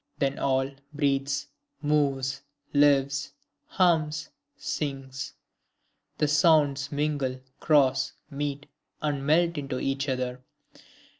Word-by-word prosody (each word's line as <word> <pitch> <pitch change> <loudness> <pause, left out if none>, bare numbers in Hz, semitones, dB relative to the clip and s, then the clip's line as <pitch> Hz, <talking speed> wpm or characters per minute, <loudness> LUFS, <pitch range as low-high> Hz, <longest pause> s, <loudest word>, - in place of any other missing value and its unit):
Then 135 -1 0
all 135 0 +1 0.2
breathes, 140 -1 0 0.3
moves, 140 -3 +1 0.3
lives, 140 -1 +3 0.3
hums, 160 -4 +2 0.3
sings; 135 - -4 0.8
the 150 - +2
sounds 145 -2 +3
mingle, 145 -3 -1 0.2
cross, 140 -4 +3 0.2
meet, 145 0 -3 0.4
and 145 -2 -1
melt 165 +2 +3
into 135 -2 -3
each 135 +1 -1
other. 125 -1 -2
140 Hz, 90 wpm, -27 LUFS, 135-150 Hz, 0.8 s, lives